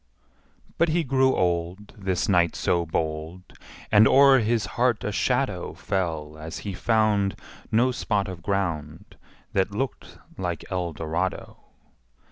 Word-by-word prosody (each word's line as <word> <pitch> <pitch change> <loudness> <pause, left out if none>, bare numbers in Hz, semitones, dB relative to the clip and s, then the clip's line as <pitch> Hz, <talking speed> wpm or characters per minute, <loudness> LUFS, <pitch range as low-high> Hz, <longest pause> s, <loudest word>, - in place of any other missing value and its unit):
But 170 - +4
he 165 +2 +1
grew 130 -1 +2
old, 90 +3 -1
This 95 -4 -1
knight 85 -4 +3
so 85 -1 0
bold, 80 +2 -3 0.5
And 105 +1 +7
o'er 135 -1 +6
his 115 -2 +1
heart 120 -2 +1
a 105 - -2
shadow 125 -4 -1
Fell 80 -5 -3
as 80 +2 -6
he 100 - -3
found 105 -1 +1 0.4
No 120 +4 +3
spot 105 -5 -1
of 90 -2 -7
ground 85 -2 -3 0.4
That 95 0 +2
looked 135 +4 -4 0.2
like 90 -3 -3
Eldorado. 85 0 -3
95 Hz, 125 wpm, -25 LUFS, 85-115 Hz, 0.5 s, And